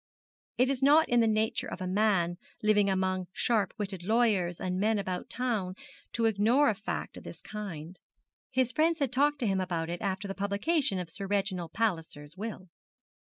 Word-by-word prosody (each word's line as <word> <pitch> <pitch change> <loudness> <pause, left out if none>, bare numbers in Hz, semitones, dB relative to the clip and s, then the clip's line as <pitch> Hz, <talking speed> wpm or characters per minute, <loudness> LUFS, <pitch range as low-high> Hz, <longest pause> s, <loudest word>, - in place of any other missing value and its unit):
It 255 +2 +3
is 270 -1 -1
not 295 +4 +6
in 245 - +4
the 225 - +4
nature 220 0 +1
of - - -6
a 185 - -3
man 185 -3 +2 0.3
living 210 -1 +4
among 185 -1 0
sharp 215 -6 +1
witted 195 -3 -4
lawyers 200 -4 +2
and 185 0 -2
men 215 +2 +2
about 185 -2 -3
town 220 -7 -1 0.4
to 230 - +1
ignore 225 +6 +4
a - - +2
fact 200 +1 -5
of - - -10
this - - -9
kind. 185 -5 -7 0.5
His 255 -1 +1
friends 320 +3 +2
had 280 -6 0
talked 290 +3 +3
to 235 - +1
him 190 -1 +1
about 170 -3 -2
it 175 - -4
after 200 0 -2
the 195 - -3
publication 200 - 0
of 180 -2 -5
Sir 195 +3 -6
Reginald 190 -4 -1
Palliser's 165 -8 -2
will. 190 -2 -6
200 Hz, 185 wpm, -30 LUFS, 185-230 Hz, 0.5 s, not